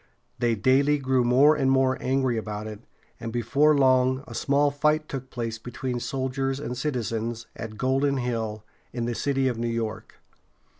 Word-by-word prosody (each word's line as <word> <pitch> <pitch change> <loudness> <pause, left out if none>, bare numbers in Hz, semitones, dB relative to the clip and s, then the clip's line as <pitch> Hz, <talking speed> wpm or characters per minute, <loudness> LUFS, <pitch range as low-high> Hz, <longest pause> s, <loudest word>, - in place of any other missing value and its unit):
They 120 -1 +2
daily 135 +7 +3
grew 130 -2 +1
more 135 +6 +5
and 135 -3 +1
more 130 -1 +3
angry 130 -2 +1
about 105 -1 -4
it, 105 -1 -7 0.4
and 115 - -5
before 145 +6 +3
long 130 0 +3
a - - -10
small 145 +1 +2
fight 150 +2 +1
took 130 -1 -6
place 115 -2 -4
between 125 +1 -4
soldiers 135 +2 -2
and 125 -4 -4
citizens, 115 -3 -3
at 110 -1 -7
Golden 135 +3 +1
Hill, 115 -4 -3 0.3
in 120 -2 -3
the 120 - -1
city 135 +2 0
of 120 -3 -2
New 120 - -1
York. 115 -1 -4
130 Hz, 165 wpm, -26 LUFS, 115-135 Hz, 0.4 s, more